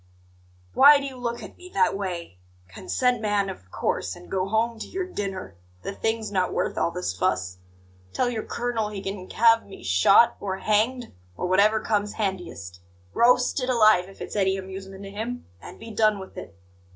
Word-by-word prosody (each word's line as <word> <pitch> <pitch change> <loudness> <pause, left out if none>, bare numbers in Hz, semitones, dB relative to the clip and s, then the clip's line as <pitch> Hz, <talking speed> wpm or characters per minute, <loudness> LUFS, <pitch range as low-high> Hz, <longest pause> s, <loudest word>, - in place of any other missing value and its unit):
Why 285 +1 +8
do 280 - -5
you 270 -2 -6
look 240 -1 -4
at - - -11
me 365 - -11
that 190 0 +3
way? 175 - -5 0.3
Consent, 245 - -1
man, 205 -2 0
of 90 - -13
course, - - -2
and - - -14
go 190 0 0
home 225 +2 0
to - - -6
your 375 0 -3
dinner; 195 - -5 0.3
the - - -4
thing's 220 0 -2
not 185 -2 +1
worth - - -1
all - - +1
this 170 - -3
fuss. 90 0 -1 0.5
Tell 250 - 0
your 235 -3 -2
colonel 235 -3 -2
he 200 -2 -6
can 195 -1 -5
have 230 0 +4
me 195 - -12
shot, 95 - +5
or 190 -1 -3
hanged, 220 - 0 0.2
or - - -2
whatever 200 +4 +4
comes 210 -1 -1
handiest 175 - -4 0.3
roasted 250 +2 +3
alive, 215 -6 +4
if 195 - -15
it's - - -6
any 190 -1 +2
amusement 190 +1 -8
to 195 - -8
him 230 +4 -5 0.2
and - - -11
be 225 - -9
done 215 -1 +3
with 190 -1 -10
it!" - - -9
205 Hz, 185 wpm, -25 LUFS, 190-230 Hz, 0.5 s, Why